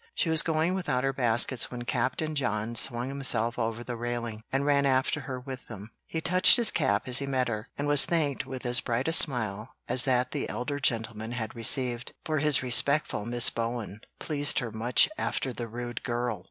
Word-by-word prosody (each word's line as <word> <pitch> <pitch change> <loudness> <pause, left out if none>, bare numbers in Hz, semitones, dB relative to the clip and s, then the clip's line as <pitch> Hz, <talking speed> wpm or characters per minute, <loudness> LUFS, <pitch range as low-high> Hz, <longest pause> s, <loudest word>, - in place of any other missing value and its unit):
She 165 - -1
was 160 0 +6
going 160 +2 -1
without 175 -9 -2
her 135 0 -1
baskets 120 0 +3
when 120 -1 -7
Captain 155 +6 -2
John 115 -5 -2
swung 120 +1 +2
himself 125 -4 -2
over 115 +1 -3
the 120 0 -6
railing, 120 -2 -5
and 135 +1 -1
ran 140 -1 +2
after 130 +3 0
her 130 -2 -7
with 130 0 -9
them. 105 0 -10 0.2
He 160 - -4
touched 185 +7 +6
his 235 -3 +4
cap 130 -9 -1
as 125 0 +6
he 140 - -5
met 130 -2 -1
her, 110 -1 -5
and 145 - -3
was 145 -1 +6
thanked 150 -6 -1
with 130 -1 -7
as 120 0 +3
bright 120 +3 -2
a 160 - +1
smile 110 -7 +2
as 130 - +4
that 125 -1 +1
the - - -4
elder 145 +3 -4
gentleman 115 -3 -2
had 115 -2 -5
received; 120 +1 0
for 155 -1 -1
his 150 -2 +2
respectful 130 -2 +1
"Miss 120 0 +3
Bowen" 115 -2 -5 0.2
pleased 145 -2 +1
her 120 -4 -2
much 115 +3 +3
after 130 - -3
the 120 0 -6
rude 120 +1 -7
"Girl!" 120 -3 -3
125 Hz, 200 wpm, -27 LUFS, 115-140 Hz, 0.2 s, was